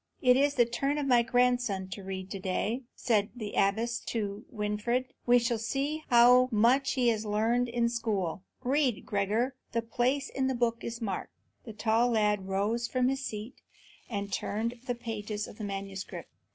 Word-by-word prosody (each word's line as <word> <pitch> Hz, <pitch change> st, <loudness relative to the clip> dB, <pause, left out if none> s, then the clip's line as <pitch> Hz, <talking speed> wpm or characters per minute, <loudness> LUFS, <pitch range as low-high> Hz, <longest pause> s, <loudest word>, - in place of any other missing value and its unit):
"It 250 Hz, -2 st, +5 dB
is 285 Hz, +2 st, +3 dB
the 240 Hz, -, +5 dB
turn 275 Hz, +5 st, -1 dB
of 290 Hz, -, -1 dB
my 245 Hz, -3 st, +5 dB
grandson 245 Hz, -5 st, +1 dB
to 200 Hz, -, -6 dB
read 190 Hz, 0 st, -6 dB
to 195 Hz, -, -4 dB
day," 205 Hz, +6 st, -1 dB
said 215 Hz, -4 st, +1 dB
the 215 Hz, -4 st, -6 dB
abbess 225 Hz, +4 st, +1 dB
to 210 Hz, -1 st, -3 dB
Winfried; 235 Hz, +4 st, -2 dB
"we 245 Hz, 0 st, +7 dB
shall 235 Hz, -1 st, 0 dB
see 280 Hz, +7 st, -2 dB
how 250 Hz, +1 st, +7 dB
much 240 Hz, +5 st, +3 dB
he 250 Hz, -3 st, +3 dB
has 220 Hz, -2 st, 0 dB
learned 225 Hz, +4 st, +1 dB
in 235 Hz, 0 st, 0 dB
the 235 Hz, -, +3 dB
school. 200 Hz, -7 st, -1 dB, 0.2 s
Read, 265 Hz, -2 st, +1 dB
Gregor; 215 Hz, +6 st, 0 dB, 0.2 s
the 230 Hz, 0 st, 0 dB
place 250 Hz, +4 st, 0 dB
in 265 Hz, -1 st, -1 dB
the 265 Hz, -, 0 dB
book 235 Hz, -1 st, 0 dB
is 235 Hz, +1 st, -5 dB
marked." 195 Hz, -4 st, -4 dB, 0.3 s
The 225 Hz, -, -7 dB
tall 225 Hz, +3 st, +2 dB
lad 210 Hz, -4 st, +1 dB
rose 210 Hz, +5 st, 0 dB
from 255 Hz, 0 st, +1 dB
his 270 Hz, 0 st, -2 dB
seat 215 Hz, +1 st, -6 dB, 0.5 s
and 200 Hz, -3 st, -4 dB
turned 230 Hz, +3 st, -2 dB
the 245 Hz, -, 0 dB
pages 215 Hz, -3 st, -4 dB
of 210 Hz, -, -13 dB
the -, -, -5 dB
manuscript. 195 Hz, -1 st, -6 dB
230 Hz, 180 wpm, -30 LUFS, 210-245 Hz, 0.5 s, we